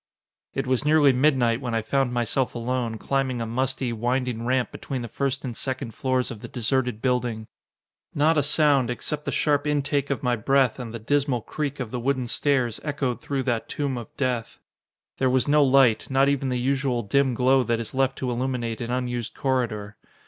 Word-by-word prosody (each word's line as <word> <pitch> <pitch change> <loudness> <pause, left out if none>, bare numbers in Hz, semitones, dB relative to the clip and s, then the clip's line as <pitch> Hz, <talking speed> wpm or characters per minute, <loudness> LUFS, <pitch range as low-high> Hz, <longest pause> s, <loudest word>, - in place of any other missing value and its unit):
It 135 - -1
was 130 +1 +1
nearly 150 -2 +5
midnight 125 -3 +2
when 120 -4 -2
I 115 - 0
found 135 +2 +1
myself 120 +2 0
alone, 120 -1 -2
climbing 135 0 -1
a 115 - -2
musty, 130 +1 -1
winding 120 0 -1
ramp 130 -1 +1
between 130 -3 -5
the - - -4
first 135 +4 -2
and 120 -3 -4
second 130 -2 -4
floors 130 0 0
of 115 - -7
the - - -7
deserted 125 -2 -1
building. 125 -4 0 0.7
Not 155 +3 +3
a 150 - +4
sound, 145 -3 +3
except 145 +5 -4
the - - -1
sharp 145 -1 +1
intake 145 -1 0
of 140 - -2
my 125 -1 +2
breath 130 +2 +2
and 120 -3 -6
the 115 - -5
dismal 135 +1 0
creak 145 +3 -4
of 120 -4 -4
the 125 - -3
wooden 130 +1 0
stairs, 125 -2 0
echoed 140 -5 -2
through 135 -2 -2
that 120 -3 -1
tomb 140 -3 -2
of 120 -3 -6
death. 125 -4 -2 0.6
There 130 - +3
was 130 +1 +2
no 150 0 +5
light, 130 -4 +4
not 135 +1 +3
even 140 -1 +1
the 125 - 0
usual 130 -1 0
dim 130 +5 +2
glow 130 +2 +4
that 120 -2 0
is 115 - -6
left 135 0 +1
to 125 -2 -2
illuminate 120 -2 -2
an 115 - -4
unused 120 -2 -2
corridor. 115 -6 -1
130 Hz, 195 wpm, -25 LUFS, 120-140 Hz, 0.7 s, nearly